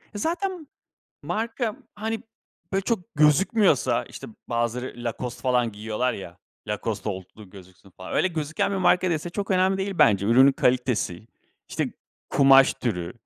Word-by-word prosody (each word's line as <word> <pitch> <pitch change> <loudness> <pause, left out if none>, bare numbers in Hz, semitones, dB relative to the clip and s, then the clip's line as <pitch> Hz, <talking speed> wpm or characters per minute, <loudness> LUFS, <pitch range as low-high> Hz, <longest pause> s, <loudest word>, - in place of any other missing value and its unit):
Zaten 345 - -3 0.6
marka, 225 0 -2 0.2
hani, 220 +2 -4 0.5
böyle, 195 0 +1
çok 225 0 -3
gözükmüyorsa, 150 - +3
işte, - - -10 0.2
bazıları 120 +1 -2
Lacoste 120 +1 -5
falan 125 -3 +1
giyiyorlar 110 +4 -2
ya, 90 -4 -9 0.3
Lacoste 105 0 -3
olduğu 95 +1 -8
gözüksün 95 0 -16
falan 95 +1 -10
öyle 185 - +2
gözüken 160 +3 -2
bir - - -1
marka 185 -1 +3
değilse 165 +1 -2
çok 200 +2 -4
önemli 190 +1 +2
değil 195 0 -2
bence. 100 -3 +4
Ürünün 130 +5 +6
kalitesi, 125 -7 0 0.4
işte, - - -2 0.4
kumaş 135 -1 +6
türü, 90 -7 -3
130 Hz, 135 wpm, -25 LUFS, -, 0.6 s, Ürünün